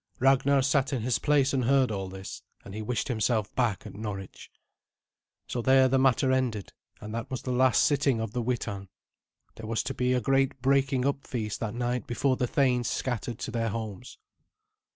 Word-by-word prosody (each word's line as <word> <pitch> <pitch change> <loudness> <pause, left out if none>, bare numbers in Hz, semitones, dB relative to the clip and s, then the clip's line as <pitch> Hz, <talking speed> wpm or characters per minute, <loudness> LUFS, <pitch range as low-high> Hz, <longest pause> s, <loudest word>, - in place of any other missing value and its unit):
Ragnar 135 +1 +4
sat 140 +1 +1
in 125 -5 -2
his 125 +1 +1
place 140 -2 +2
and 130 -3 +1
heard 130 -2 +3
all 95 -2 -3
this, 95 0 -8 0.2
and 100 - -9
he 110 - -5
wished 120 +2 -2
himself 110 -3 0
back 120 -6 0
at - - -8
Norwich. 100 -2 -7 1.0
So 120 - -3
there 130 +2 +5
the 135 +1 +2
matter 130 0 +3
ended, 125 -6 -1 0.3
and 105 0 -8
that 115 0 -4
was 130 - -5
the 130 - -3
last 130 +1 +4
sitting 140 -4 +2
of 110 -2 -3
the 125 - -1
Witan. 110 -5 -3 0.7
There 110 - -8
was 115 0 -1
to - - -3
be 125 +1 0
a 125 - +2
great 135 +2 +1
breaking 135 0 +2
up 140 0 -1
feast 110 -4 -3
that 115 0 -4
night 125 0 -2
before 130 +2 +1
the 125 - -1
thanes 125 -2 +1
scattered 120 -2 -3
to - - -5
their 115 -1 -1
homes. 110 -3 -6
125 Hz, 195 wpm, -28 LUFS, 110-130 Hz, 1.0 s, there